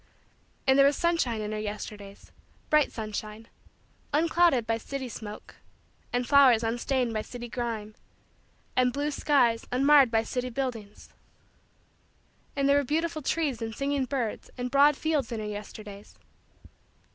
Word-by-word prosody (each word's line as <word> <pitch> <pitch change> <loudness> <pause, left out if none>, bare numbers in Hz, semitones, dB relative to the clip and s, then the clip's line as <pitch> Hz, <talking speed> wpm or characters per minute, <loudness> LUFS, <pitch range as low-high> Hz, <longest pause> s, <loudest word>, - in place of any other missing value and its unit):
And 265 +1 +4
there 275 - +7
was 280 - +1
sunshine 330 -10 0
in 210 0 -4
her 215 - -3
Yesterdays 205 -1 -7 0.4
bright 305 -2 +4
sunshine 215 0 -6 0.6
unclouded 320 -4 +3
by 225 0 -1
city 270 +2 -5
smoke; 215 -3 -9 0.5
and 245 0 -1
flowers 265 -5 +6
unstained 240 +1 -1
by 215 - -1
city 240 +2 -8
grime; 225 -3 -4 0.8
and 250 -1 +3
blue 290 +3 -2
skies 250 -6 +2
unmarred 275 +1 +5
by 225 -1 +2
city 250 +2 -3
buildings; 230 -5 -5 1.5
and 275 -1 +1
there 280 0 +5
were 285 - +2
beautiful 315 +3 -1
trees 280 -5 -1
and 225 -1 -4
singing 275 +1 -1
birds 245 -4 -3
and 250 0 -4
broad 285 +1 +5
fields 300 -7 -1
in 230 - -3
her 215 - -4
Yesterdays. 210 -1 -9
245 Hz, 140 wpm, -28 LUFS, 220-280 Hz, 1.5 s, there